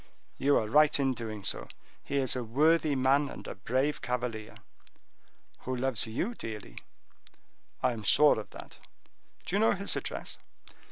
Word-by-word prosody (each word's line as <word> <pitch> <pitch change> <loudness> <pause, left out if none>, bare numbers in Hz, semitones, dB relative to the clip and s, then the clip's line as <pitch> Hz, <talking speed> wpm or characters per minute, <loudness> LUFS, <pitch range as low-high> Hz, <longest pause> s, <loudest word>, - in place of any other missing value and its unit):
"You 140 +1 +4
are - - +1
right 150 +5 +4
in 135 -1 +2
doing 110 -4 -6
so; - - -1 0.4
he 140 - -4
is 135 -2 +1
a 125 - -2
worthy 150 +5 +3
man 135 +2 +3
and - - -9
a - - -5
brave 130 +8 -1
cavalier." 120 -3 -4 1.0
"Who 130 - -4
loves 125 -3 0
you 150 - -2
dearly." 105 - -7 1.0
"I 125 - +3
am 115 - -6
sure 145 +4 +5
of 105 - -8
that. - - -12 0.7
Do 180 - -2
you - - +3
know 220 - +4
his 200 +1 -1
address?" - - -4
130 Hz, 160 wpm, -30 LUFS, 115-145 Hz, 1.0 s, sure